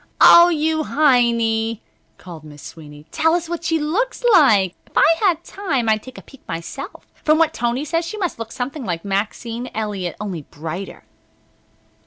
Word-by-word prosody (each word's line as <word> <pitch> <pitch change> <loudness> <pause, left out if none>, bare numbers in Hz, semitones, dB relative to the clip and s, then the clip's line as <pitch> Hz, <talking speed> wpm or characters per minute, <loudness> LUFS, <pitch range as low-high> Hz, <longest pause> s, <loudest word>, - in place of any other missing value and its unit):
"O, 345 +1 +8
you 315 -1 0
Heiny!" 235 -5 +2 0.4
called 170 -4 -11
Miss 150 -1 -13
Sweeney, 150 -2 -12
"tell 325 +1 +2
us 345 -1 -2
what 340 0 -5
she 325 -1 +1
looks 375 +14 -2
like. 210 - +5
If - - -9
I 325 +1 +5
had 350 -5 +1
time 285 - -3
I'd 215 -1 +2
take 255 +2 -12
a - - -11
peek 275 - -17
myself. 170 - -7 0.2
From 310 0 +3
what 320 -1 +2
Tony 240 +4 -2
says 330 +2 -1
she 335 +6 -6
must 360 - -3
look 230 0 -6
something 265 +3 -5
like 175 -5 -4
Maxine 225 +5 -3
Elliot, 205 -5 -3
only 190 -6 -5
brighter." 160 +6 -8
245 Hz, 170 wpm, -20 LUFS, 200-320 Hz, 0.4 s, O